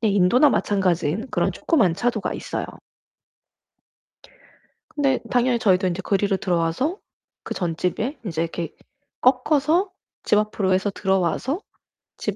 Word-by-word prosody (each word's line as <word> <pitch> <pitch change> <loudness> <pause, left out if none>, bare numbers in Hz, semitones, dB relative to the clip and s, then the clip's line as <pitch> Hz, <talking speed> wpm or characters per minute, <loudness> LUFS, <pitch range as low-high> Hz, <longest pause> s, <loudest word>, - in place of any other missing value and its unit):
네 220 - +2
인도나 205 +9 +4
마찬가지인 185 - 0
그런 - - +1
조그만 195 - +2
차도가 245 +7 -1
있어요. - - -4 2.3
근데 275 -3 +2
당연히 245 -1 +2
저희도 190 -3 +3
인제 180 +2 -2
그리로 195 0 +1
들어와서 180 - 0 0.5
그 - - -5
전 170 -3 -2
집에 225 - -2
인제 165 -5 -2
이렇게 165 -1 -5 0.5
꺾어서 300 +8 +3 0.3
집 210 - +3
앞으로 210 -2 +1
해서 190 +2 +1
들어와서 195 - 0 0.6
집 - - -3
205 Hz, 290 characters per minute, -23 LUFS, 180-255 Hz, 2.3 s, 인도나